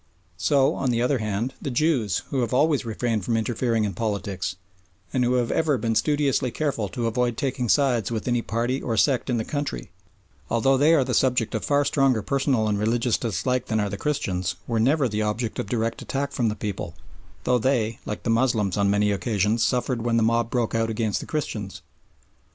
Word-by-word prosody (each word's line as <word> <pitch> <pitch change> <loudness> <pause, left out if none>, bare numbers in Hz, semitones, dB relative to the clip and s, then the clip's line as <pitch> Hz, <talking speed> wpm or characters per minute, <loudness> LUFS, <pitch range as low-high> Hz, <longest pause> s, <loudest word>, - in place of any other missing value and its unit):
So, 140 0 +3
on 135 - -1
the 120 -1 +1
other 125 +2 +1
hand, 110 +4 -2
the - - -3
Jews, 125 - +1
who 135 - 0
have 120 0 -1
always 145 -1 +2
refrained 115 -2 -1
from 115 +3 0
interfering 115 0 0
in 100 -2 -1
politics, 100 -3 -3 0.6
and 130 - +2
who 120 +1 +2
have 120 -2 +1
ever 155 -4 +2
been 115 -2 -1
studiously 145 +1 +1
careful 120 -7 -2
to 120 -3 -3
avoid 120 0 0
taking 130 -3 -2
sides 125 -7 +2
with 110 0 -3
any 120 -1 +1
party 120 +4 -1
or 115 -2 -2
sect 130 +3 +2
in 120 - +1
the 110 - -2
country, 145 - -4 0.6
although 115 +4 +3
they 150 +5 +5
are 140 - +4
the 125 0 -3
subject 125 -2 +2
of 110 - -2
far 145 0 +2
stronger 135 -6 +2
personal 135 -5 +1
and 105 -1 0
religious 115 +2 +1
dislike 120 +3 -1
than 110 -1 0
are 105 -1 0
the - - -3
Christians, 95 -7 -2
were 115 -2 -1
never 135 +4 +3
the 105 -1 -2
object 110 +2 -2
of 100 - -3
direct 115 0 -1
attack 140 +1 -3
from 120 -5 0
the 105 - -3
people, 100 -5 -5 0.5
though 125 -1 +2
they, 115 -3 0
like 105 - -5
the 115 - 0
Moslems, 115 -5 +1
on 100 -1 +2
many 105 +1 +2
occasions 105 +2 +1
suffered 125 0 0
when 115 0 +1
the 115 - +3
mob 115 +1 +2
broke 120 -3 -1
out 115 0 +1
against 110 -2 -1
the - - -8
Christians. 105 - -4
115 Hz, 205 wpm, -24 LUFS, 110-130 Hz, 0.6 s, they